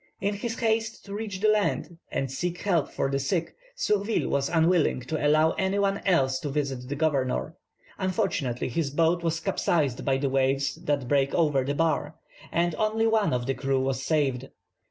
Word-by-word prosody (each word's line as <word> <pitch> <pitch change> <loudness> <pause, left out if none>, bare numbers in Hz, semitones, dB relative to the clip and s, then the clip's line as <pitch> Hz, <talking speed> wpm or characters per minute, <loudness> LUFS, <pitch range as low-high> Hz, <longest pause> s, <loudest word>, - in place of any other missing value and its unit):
In 200 +1 0
his 225 +3 -4
haste 225 0 -1
to 200 - -8
reach 205 -3 -5
the 215 - +3
land, 205 -5 0
and 135 -1 -2
seek 175 +5 -3
help 175 -7 +1
for - - -1
his 135 0 -1
sick, 170 -3 -1 0.2
Surville 210 - 0
was 140 0 0
unwilling 165 -4 +2
to 145 +3 -1
allow 155 +2 +4
any 190 +1 +1
one 200 0 +1
else 135 -8 +3
to 145 - -4
visit 135 -3 -3
the 145 - -2
governor. 145 -1 0 0.5
Unfortunately 185 - -1
his 145 +3 -1
boat 165 +4 +2
was 165 -1 -1
capsized 145 -9 0
by 135 -1 +2
the 140 +1 0
waves 135 +1 +1
that 140 -3 -2
break 140 0 +2
over 150 -5 +2
the 140 +2 -2
bar, 155 -1 0 0.4
and 170 0 +1
only 220 +1 +1
one 220 -2 +2
of 125 -1 -1
the 135 - 0
crew 135 0 0
was 135 0 -1
saved. 135 -3 0
155 Hz, 185 wpm, -27 LUFS, 135-190 Hz, 0.5 s, allow